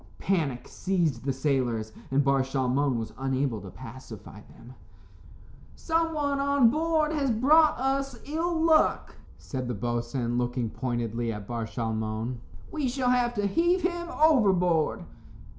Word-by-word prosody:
Panic 150 -10 -1
seized 165 -10 -1
the 135 - +1
sailors, 130 -5 -1 0.2
and 140 +2 +2
Bar 135 0 +3
Shalmon 135 0 0
was 110 -1 -5
unable 135 -4 -1
to 95 - -9
pacify 115 0 -11
them. 120 +2 -14 1.0
"Someone 320 -4 0
on 280 -4 +4
board 315 +1 +1
has 285 -3 0
brought 300 +8 +4
us 270 0 -1
ill 325 +3 -1
luck," 320 -1 +2 0.2
said 130 -2 -5
the 125 - -3
boatswain, 120 +2 -2
looking 120 -2 -2
pointedly 120 0 -2
at 105 -2 -6
Bar 115 0 -4
Shalmon; 110 +1 -3 0.3
"we 300 -4 -1
shall 250 0 0
have 245 -1 +1
to 205 -1 0
heave 345 - +2
him 345 -1 -1
overboard." 190 - +3
140 Hz, 135 wpm, -27 LUFS, -, 1.0 s, on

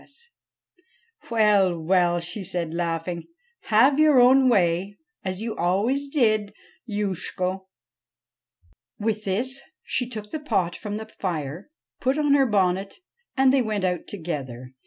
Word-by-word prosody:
A - - -19
I - - -23
SNEGOROTCHKA 470 +12 -13 1.0
'Well, 205 -6 +3
well,' 175 +1 +2
she 175 +4 -4
said, 175 -3 -3
laughing; 170 0 -3 0.4
'have 260 +7 +4
your 305 -4 +6
own 255 +1 +6
way, 190 -1 +1 0.3
as 185 +2 -4
you 225 -1 -3
always 220 +11 0
did, 215 -7 +1 0.3
Youshko.' 190 -2 -3 1.3
With 215 0 -2
this 250 +8 -1 0.2
she 250 -2 -2
took 215 -3 -7
the 310 - -3
pot 195 - -1
from 210 -1 -5
the 220 - -6
fire, 170 - -5 0.3
put 265 +2 0
on 295 -2 +3
her 275 -2 +4
bonnet, 195 -2 0 0.4
and 265 0 +5
they 270 - +4
went 215 -4 -2
out 180 -2 -1
together. 130 -9 -6
205 Hz, 140 wpm, -24 LUFS, 180-245 Hz, 1.3 s, your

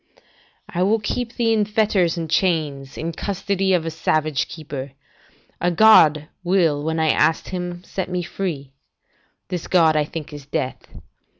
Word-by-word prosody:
["I 175 - -3
will 205 +4 +3
keep 235 +2 -3
thee 230 -2 +2
in 215 -1 +2
fetters 205 -5 +1
and 165 -1 -3
chains, 150 -6 -1
in 165 +1 -3
custody 195 +2 -1
of 170 -3 +1
a 165 - -2
savage 155 -3 0
keeper. 140 -4 -7 0.7
A 175 - +2
god 160 -6 +6 0.2
will 170 -5 +2
when 160 +1 -1
I 160 -1 +2
ask 160 +2 +1
Him, 180 -1 -5
set 190 0 -4
me 180 -1 -2
free. 160 -7 -4 0.8
This 180 -3 -4
god 165 -4 +4
I 150 -1 +2
think 155 -1 -7
is 145 -2 -10
death. 140 -4 -3
170 Hz, 160 wpm, -21 LUFS, 155-190 Hz, 0.8 s, god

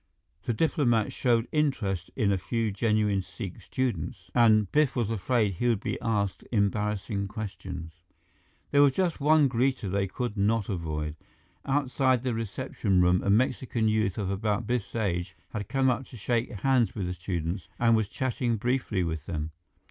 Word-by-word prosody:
The 120 - 0
diplomats 120 - +2
showed 120 -2 +2
interest 110 - 0
in 105 -6 +2
a 100 - +2
few 115 +2 -1
genuine 105 -2 +1
Sikh 90 +1 -8
students, 125 - -3
and 110 -4 +4
Biff 150 -4 +3
was 115 -3 0
afraid 110 0 +1
he 120 +8 -1
would 115 -4 +2
be - - -3
asked 105 -4 -1
embarrassing 105 -1 0
questions. 90 -6 -7 0.7
There 145 - +5
was 140 -2 +6
just 175 -3 0
one 150 0 +5
greeter 125 -5 0
they 100 0 +1
could 120 +3 -3
not 105 +1 +1
avoid. 80 -4 -3 0.5
Outside 135 -2 +2
the 130 -2 0
reception 110 -3 -1
room, 90 0 +4
a - - 0
Mexican 115 +1 +2
youth 110 -3 +1
of 100 -3 -1
about 105 +2 -1
Biff's 120 -2 -2
age 90 -7 -1 0.2
had 105 -3 -4
come 135 -1 +3
up 125 +1 -3
to 125 - -11
shake 120 +3 0
hands 125 +2 +1
with 100 -4 -2
the 90 - -2
students 85 0 -3
and 115 -1 +4
was 110 -2 +1
chatting 120 -1 -1
briefly 120 -4 0
with 80 -3 -4
them. 80 -3 -3
110 Hz, 165 wpm, -28 LUFS, 95-125 Hz, 0.7 s, was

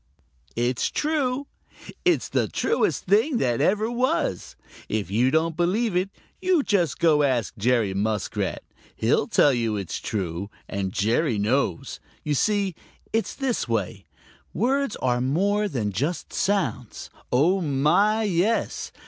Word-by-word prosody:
It's 120 +1 0
true. 285 -3 -1 0.6
It's 360 -2 +2
the - - 0
truest 460 - 0
thing 225 - +3
that 120 - 0
ever 215 +4 +2
was. 240 - -1 0.3
If 105 -4 -2
you 120 +5 +3
don't 160 +3 +1
believe 190 +5 +1
it, 185 +2 +1 0.3
you 365 -5 +3
just 180 - +1
go 155 -3 +4
ask 130 -7 0
Jerry 115 -2 +1
Muskrat. 105 +2 -2 0.3
He'll - - +1
tell 145 - +4
you 115 -3 0
it's 95 -4 -4
true, 95 -2 -3 0.2
and 100 -2 -3
Jerry 115 - +1
knows. 105 -3 -1 0.2
You 150 - -1
see, 200 +5 +1 0.4
it's 225 0 -1
this 265 - -1
way: 105 -3 -2 0.5
Words 270 +2 +1
are 125 -1 +1
more 200 +11 +1
than 115 - -2
just 145 - -3
sounds. 190 - -2 0.2
Oh, 170 +10 +3
my, 165 +9 +2
yes! 205 +3 0
150 Hz, 130 wpm, -24 LUFS, -, 0.6 s, go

